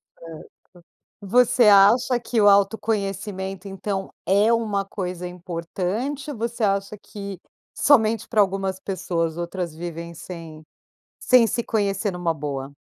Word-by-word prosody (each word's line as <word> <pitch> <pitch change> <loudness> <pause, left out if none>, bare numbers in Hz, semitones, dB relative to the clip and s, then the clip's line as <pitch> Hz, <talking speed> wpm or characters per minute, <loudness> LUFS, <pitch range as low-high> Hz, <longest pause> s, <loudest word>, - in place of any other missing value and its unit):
Certo. 165 -1 -11 0.7
Você 245 +3 +4
acha 215 +5 +5
que 235 -1 -1
o 205 - +5
autoconhecimento, 195 -2 0
então, 195 0 -4
é 205 +4 +3
uma 215 -4 0
coisa 180 -2 -5
importante 185 - -4
ou 250 - -7
você 235 +1 -3
acha 200 0 0
que 200 -2 -8 0.4
somente 225 -6 +3
pra 220 -3 +3
algumas 195 -1 -1
pessoas, 170 -4 -2
outras 175 -1 -4
vivem 170 0 -6
sem 165 -2 -10 0.6
sem 250 -3 +5
se 230 +2 -1
conhecer 205 -2 -1
numa 175 -2 -1
boa? 140 -3 -5
195 Hz, 125 wpm, -23 LUFS, 175-220 Hz, 0.7 s, acha